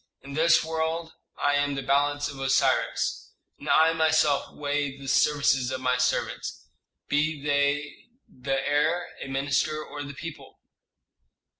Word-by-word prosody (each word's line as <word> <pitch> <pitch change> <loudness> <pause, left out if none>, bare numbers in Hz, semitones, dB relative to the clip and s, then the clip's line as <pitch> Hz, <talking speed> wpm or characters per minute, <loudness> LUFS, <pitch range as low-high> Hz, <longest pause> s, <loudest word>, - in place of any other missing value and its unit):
In 140 0 -9
this 160 +3 +4
world 160 +1 -2 0.2
I 145 - +1
am 145 0 +1
the 135 - -4
balance 145 +1 +1
of 140 -1 -8
Osiris, 135 0 0 0.3
and - - -7
I 160 +1 +5
myself 155 -3 +2
weigh 145 -1 -2
the 140 0 -10
services 135 -2 +2
of 130 0 -3
my 125 -1 +1
servants, 125 0 -2 0.4
be 150 +1 0
they 145 0 -1 0.2
the 135 +1 -3
heir, 150 +5 +1
a - - -5
minister, 145 +3 0
or 145 - -8
the 140 -1 -7
people. 165 0 -9
145 Hz, 140 wpm, -26 LUFS, 135-155 Hz, 0.4 s, I